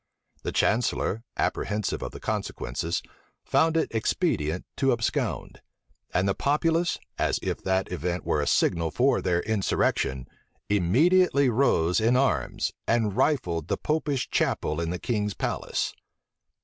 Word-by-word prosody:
The - - -3
chancellor, 110 -1 +1 0.2
apprehensive 105 -1 -1
of - - -4
the - - -9
consequences, 80 +7 -3 0.4
found 165 0 +2
it 160 - 0
expedient 95 - 0
to 135 -1 +3
abscond; 115 -2 -2 0.5
and 90 +2 +1
the 95 - +2
populace, 165 - +1 0.2
as - - +1
if - - -2
that 95 0 0
event 90 +1 -3
were 75 - +1
a 75 - -2
signal 85 -1 +2
for 130 - +2
their 90 -2 +1
insurrection, 70 - 0 0.4
immediately 140 - +4
rose 110 -8 +2
in 120 +3 +3
arms, 85 - 0
and 110 -4 +1
rifled 85 - +1
the - - 0
Popish 150 -4 -1
chapel 75 +2 0
in 85 - -2
the 90 - -2
king's 105 -1 -2
palace. - - -2
105 Hz, 135 wpm, -26 LUFS, 85-135 Hz, 0.5 s, immediately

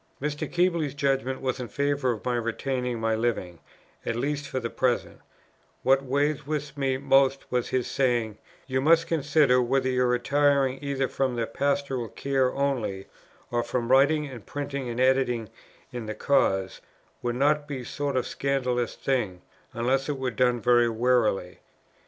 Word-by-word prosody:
Mr. 150 +1 -3
Keble's 170 -5 +1
judgment 135 -2 0
was 130 0 -2
in 125 - -4
favour 140 +3 0
of 110 - -6
my 125 - 0
retaining 125 +1 -2
my 110 0 +1
living; 110 -7 -2 0.4
at 115 - -2
least 145 +3 -2
for 130 -1 -2
the 120 - -3
present; 125 -2 -1 0.6
what 135 +1 +4
weighed 145 +2 0
with 150 -1 -3
me 135 -2 0
most 135 0 +3
was 125 -1 0
his 130 -1 0
saying, 120 -5 0 0.3
"You 130 -1 -1
must 165 +3 +4
consider, 145 -4 +3
whether 130 +2 +1
your 125 -1 +2
retiring 135 +2 +2
either 135 -2 -1
from 130 -2 -1
the 115 -1 0
Pastoral 140 0 -1
Care 135 +1 0
only, 125 -9 -2 0.4
or 120 0 +1
from 120 0 -2
writing 145 +3 +4
and 125 -6 -9
printing 140 +1 -4
and 120 +1 -4
editing 130 -4 +2 0.4
in 120 -3 -6
the 110 - -4
cause, 95 -9 +1 0.4
would 120 -1 -2
not 145 +3 +2
be 140 -3 -4
a - - -9
sort 140 0 -2
of 125 - 0
scandalous 125 -3 -1
thing, 105 -10 -2 0.3
unless 130 +3 0
it 145 - -1
were 130 -1 -2
done 125 0 +2
very 120 0 +4
warily. 115 -6 +1
130 Hz, 165 wpm, -26 LUFS, 120-140 Hz, 0.6 s, what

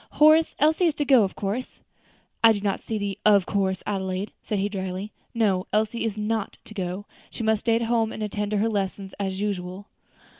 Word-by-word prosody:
"Horace, 310 +2 +5
Elsie 315 +4 +3
is 315 - 0
to 290 - -1
go 265 -4 +6
of 190 - -2
course?" 210 +6 -4 0.6
"I 225 -1 +8
do 205 - -4
not 200 -1 -1
see 220 - -3
the 200 -1 -3
of 200 -3 +5
course, 190 -2 0
Adelaide," 190 0 -2
said 210 - -2
he 195 +1 +1
dryly. 190 0 -4 0.2
"No; 195 -5 +1
Elsie 220 +3 0
is 215 -2 -2
not 215 0 -2
to - - -11
go; 190 0 -4 0.2
she - - -6
must 220 -1 +2
stay 230 +1 +2
at 230 - +1
home 225 -1 +1
and 215 - -5
attend 210 0 -2
to 210 - 0
her 215 +3 +2
lessons 195 -2 -3
as 190 -1 -2
usual." 195 -1 -3
210 Hz, 210 wpm, -25 LUFS, 195-225 Hz, 0.6 s, I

